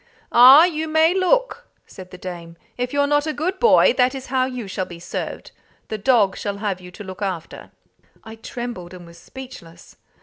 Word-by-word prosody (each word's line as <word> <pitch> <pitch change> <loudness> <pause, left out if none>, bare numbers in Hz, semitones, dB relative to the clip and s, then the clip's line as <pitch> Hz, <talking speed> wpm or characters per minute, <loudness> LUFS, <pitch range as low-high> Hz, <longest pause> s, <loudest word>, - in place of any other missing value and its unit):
"Ah, 260 +6 +9
you 320 -3 -1
may 315 +2 +3
look!" 485 +6 0 0.2
said 185 -1 -13
the 180 - -11
dame. 170 -2 -9 0.2
"If 250 0 -3
you're 285 0 +1
not 290 +1 +1
a 310 - -2
good 365 +5 -2
boy, 470 - +5
that 250 +2 +3
is 265 -1 -7
how 255 -1 +2
you 250 -5 -6
shall 190 -1 -4
be 170 -1 -11
served. 170 - -6 0.4
The 215 - -4
dog 210 -4 +2
shall 200 -1 -5
have 200 -3 -3
you 180 - -11
to 180 +3 -11
look 190 0 -10
after." 185 -5 -5 0.5
I 220 0 -11
trembled, 220 -6 -7
and 175 -1 -12
was 170 0 -15
speechless. 170 -10 -13
235 Hz, 195 wpm, -21 LUFS, 185-285 Hz, 0.5 s, Ah